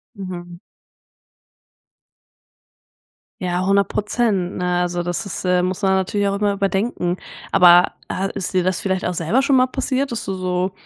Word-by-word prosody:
Mhm. 175 Hz, -3 st, -8 dB, 2.8 s
Ja, 180 Hz, 0 st, -1 dB
10 200 Hz, -1 st, +3 dB
Prozent, 210 Hz, -4 st, 0 dB
ne, 180 Hz, 0 st, 0 dB
also, 175 Hz, 0 st, -2 dB
das 175 Hz, +2 st, -3 dB
ist 200 Hz, -, -6 dB
äh, 180 Hz, -1 st, +2 dB
muss 185 Hz, +2 st, -2 dB
man 195 Hz, -1 st, +2 dB
natürlich 190 Hz, +2 st, 0 dB
auch 195 Hz, -, -1 dB
immer 205 Hz, -1 st, +1 dB
überdenken. 195 Hz, -2 st, -1 dB, 0.3 s
Aber, 175 Hz, -1 st, +6 dB, 0.2 s
äh, 195 Hz, +1 st, -2 dB
ist 180 Hz, -, -4 dB
dir 185 Hz, -1 st, +2 dB
das 185 Hz, 0 st, 0 dB
vielleicht 190 Hz, -1 st, -1 dB
auch 180 Hz, -, -1 dB
selber 170 Hz, +10 st, +1 dB
schon 275 Hz, -1 st, +3 dB
mal 255 Hz, 0 st, +4 dB
passiert, 265 Hz, 0 st, -2 dB
dass 235 Hz, -, -4 dB
du 195 Hz, -, -3 dB
so 185 Hz, 0 st, -1 dB
185 Hz, 160 wpm, -20 LUFS, 180-200 Hz, 2.8 s, Aber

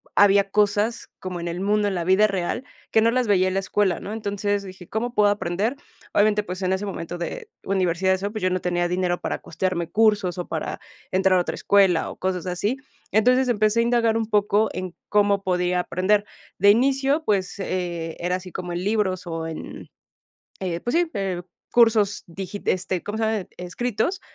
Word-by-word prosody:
había 200 Hz, -1 st, +5 dB
cosas 210 Hz, +2 st, +1 dB
como 185 Hz, -2 st, -5 dB
en 170 Hz, -, -4 dB
el 170 Hz, +2 st, -4 dB
mundo, 205 Hz, +1 st, +2 dB
en 200 Hz, -, -1 dB
la 175 Hz, -, -1 dB
vida 190 Hz, +4 st, +4 dB
real, 195 Hz, +6 st, -2 dB, 0.3 s
que 220 Hz, -, +4 dB
no 230 Hz, +1 st, +4 dB
las 250 Hz, -1 st, +1 dB
veía 185 Hz, -2 st, +4 dB
en 185 Hz, -, -1 dB
la 195 Hz, -, +1 dB
escuela, 190 Hz, -2 st, +1 dB
¿no?, 205 Hz, -, -6 dB
entonces, 205 Hz, -1 st, -1 dB
dije: 185 Hz, -2 st, -11 dB
"¿Cómo 240 Hz, +3 st, -2 dB
puedo 210 Hz, -1 st, +5 dB
aprender?" 205 Hz, +4 st, -1 dB, 0.4 s
Obviamente, 210 Hz, 0 st, +3 dB
pues, 185 Hz, -1 st, -6 dB
en 185 Hz, 0 st, +1 dB
ese 190 Hz, +2 st, -2 dB
momento 175 Hz, -3 st, -5 dB
de 430 Hz, -, -5 dB
universidad 190 Hz, -1 st, +1 dB
y -, -, +4 dB
eso, 195 Hz, +2 st, -3 dB
pues 215 Hz, 0 st, -6 dB
yo 185 Hz, -, +3 dB
no 185 Hz, -, 0 dB
tenía 175 Hz, -1 st, 0 dB
dinero 180 Hz, 0 st, 0 dB
para -, -, -2 dB
costearme 170 Hz, 0 st, -2 dB
cursos 210 Hz, -5 st, +2 dB
o 180 Hz, -, -4 dB
para 160 Hz, -2 st, -4 dB, 0.3 s
entrar 185 Hz, 0 st, +3 dB
a -, -, +3 dB
otra -, -, -3 dB
escuela 195 Hz, -5 st, +3 dB
o -, -, -9 dB
cosas 185 Hz, -1 st, -2 dB
así. 185 Hz, +6 st, -1 dB, 0.4 s
Entonces, 250 Hz, +4 st, +4 dB
empecé 215 Hz, -1 st, +2 dB
a -, -, +4 dB
indagar 230 Hz, -1 st, +2 dB
un 225 Hz, -, 0 dB
poco 210 Hz, 0 st, +2 dB
en 185 Hz, -1 st, -5 dB
cómo 205 Hz, -1 st, +2 dB
podía 180 Hz, -1 st, +1 dB
aprender. 200 Hz, +4 st, +1 dB, 0.3 s
De 200 Hz, +2 st, +5 dB
inicio, 270 Hz, +6 st, +2 dB
pues, 195 Hz, -7 st, 0 dB
eh, 175 Hz, -4 st, -3 dB
era 180 Hz, +1 st, 0 dB
así 185 Hz, 0 st, -7 dB
como 175 Hz, +1 st, -5 dB
en 175 Hz, +1 st, -3 dB
libros 195 Hz, -3 st, 0 dB
o 165 Hz, -1 st, -3 dB
en 160 Hz, -1 st, -8 dB, 0.7 s
eh, 175 Hz, -3 st, -3 dB
pues 240 Hz, -, -2 dB
sí, 345 Hz, -1 st, +2 dB
eh, 190 Hz, -3 st, -2 dB, 0.3 s
cursos 220 Hz, -4 st, +4 dB
digit 195 Hz, +3 st, -7 dB
este, 185 Hz, -1 st, 0 dB
¿cómo 210 Hz, +1 st, -5 dB
se 225 Hz, -, -1 dB
llama?, 220 Hz, -3 st, -1 dB
escritos, 240 Hz, -, -2 dB
195 Hz, 200 wpm, -24 LUFS, 180-215 Hz, 0.7 s, había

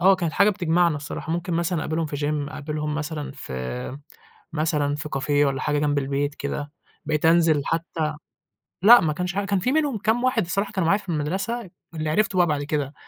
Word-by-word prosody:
آه 190 Hz, +2 st, +6 dB
كانت 170 Hz, -4 st, -2 dB
حاجة 200 Hz, +5 st, +4 dB
بتجمعنا 175 Hz, -4 st, +2 dB
الصراحة، 145 Hz, +2 st, -5 dB
ممكن 175 Hz, +1 st, -2 dB
مثلًا 170 Hz, 0 st, 0 dB
أقابلهم 160 Hz, +1 st, -1 dB
في 145 Hz, -, -5 dB
gym، 145 Hz, 0 st, -1 dB
أقابلهم 150 Hz, 0 st, -3 dB
مثلًا 150 Hz, -1 st, -4 dB
في 65 Hz, -, -5 dB, 0.5 s
مثلًا 150 Hz, -2 st, 0 dB
في 150 Hz, +1 st, -5 dB
cafe 140 Hz, +2 st, -3 dB, 0.2 s
والَّا 135 Hz, -1 st, -1 dB
حاجة 150 Hz, -1 st, 0 dB
جنب 145 Hz, -1 st, +1 dB
البيت 140 Hz, +1 st, -1 dB
كده، 145 Hz, +1 st, -4 dB, 0.3 s
بقيت 155 Hz, 0 st, -1 dB
أنزل 165 Hz, -3 st, +4 dB
حتى 165 Hz, -1 st, -2 dB, 0.7 s
لأ 235 Hz, +5 st, +9 dB
ما 155 Hz, -2 st, +1 dB
كانش 180 Hz, +3 st, -3 dB
حاجة 200 Hz, 0 st, 0 dB
كان 195 Hz, -1 st, +1 dB
في 250 Hz, +8 st, 0 dB
منهم 295 Hz, -5 st, +1 dB
كام 225 Hz, +4 st, +1 dB
واحد 250 Hz, -6 st, +2 dB
الصراحة 200 Hz, +4 st, -1 dB
كانوا 185 Hz, -4 st, 0 dB
معايا 200 Hz, +4 st, +4 dB
في 195 Hz, -, -13 dB
المدرسة، 190 Hz, +8 st, -2 dB, 0.2 s
اللي 155 Hz, -1 st, -2 dB
عِرِفتُه 195 Hz, +3 st, +1 dB
بَقى 175 Hz, -, +5 dB
بعد 145 Hz, -2 st, 0 dB
كده، 145 Hz, -1 st, -2 dB
160 Hz, 195 wpm, -24 LUFS, 145-185 Hz, 0.7 s, لأ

